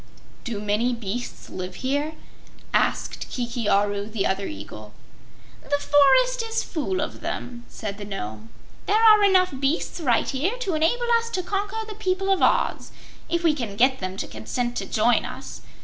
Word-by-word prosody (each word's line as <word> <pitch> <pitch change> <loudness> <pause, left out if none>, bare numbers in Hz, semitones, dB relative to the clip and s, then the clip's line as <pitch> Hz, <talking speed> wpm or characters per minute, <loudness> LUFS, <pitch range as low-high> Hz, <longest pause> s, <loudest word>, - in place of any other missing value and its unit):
"Do 230 -5 -4
many 210 +4 +1
beasts 230 +2 -5
live 185 0 -6
here?" 290 +4 0 0.6
asked - - 0
Kiki 235 -3 -2
Aru, 205 +1 +1
the 215 -3 -1
other 195 +1 0
eagle. 105 +1 -9 0.7
"The 285 - 0
forest 290 - +4
is 455 0 -1
full 360 +3 -2
of - - -5
them," 240 -1 -5
said 205 -2 -6
the 205 - -6
Nome. 110 - -6 0.4
"There 415 - +4
are 430 -2 +7
enough 370 -4 +4
beasts 280 +6 0
right 250 -8 +2
here 340 - -1
to 405 -8 -2
enable 330 +11 +2
us 460 0 -6
to 370 -5 -2
conquer 405 +4 -2
the 430 - -6
people 390 -2 -1
of 385 - +2
Oz, - - +2 0.4
if 340 0 0
we 325 -2 +4
can 235 -9 -4
get 260 +4 +3
them 185 0 -4
to - - -3
consent 240 - -3
to - - -3
join 235 +2 +3
us. - - -8
265 Hz, 170 wpm, -24 LUFS, -, 0.7 s, are